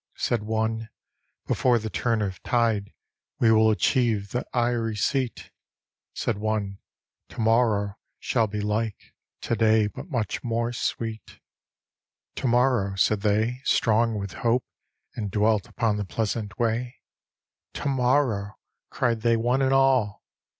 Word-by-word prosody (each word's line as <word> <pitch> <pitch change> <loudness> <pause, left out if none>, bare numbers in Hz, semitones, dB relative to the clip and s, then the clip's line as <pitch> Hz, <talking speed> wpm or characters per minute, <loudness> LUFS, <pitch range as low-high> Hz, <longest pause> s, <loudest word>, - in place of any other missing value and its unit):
Said 120 -3 0
one, 110 +1 -2 0.3
" - - -50
Before 125 -2 +3
the 110 -1 -4
turn 110 +6 0
of 95 -3 -5
tide 115 -4 0 0.5
We 115 - +4
will 110 0 +5
achieve 110 -2 +1
the 125 - -3
eyrie 120 -2 0
seat." 130 +3 -1 0.6
Said 110 -4 -2
one, 105 -2 -2 0.2
" - - -57
To - - -12
morrow 110 -3 +2 0.2
shall 115 -3 0
be 105 0 -4
like 105 0 -3 0.3
To 115 - -1
day, 110 -1 +4
but 135 - -7
mudi 115 - -2
more 115 0 -1
sweet" 110 -2 -4 0.5
" - - -63
To - - -1
morrow," 120 -5 +2
said 100 +1 +2
they, 110 +4 +1
strong 115 -2 +2
with 100 -1 -5
hope, 120 0 +2 0.5
And 105 -3 -4
dwelt 105 0 +1
upon 110 -3 0
the 105 - -2
pleasant 105 0 -3
way: 120 +2 -1 0.4
" - - -62
To - - -3
morrow," 125 -6 +1 0.3
cried 115 -2 0
they 115 0 +3
one 120 +4 +1
and 135 0 +2
all. 135 -6 +2
115 Hz, 145 wpm, -25 LUFS, 105-120 Hz, 0.6 s, will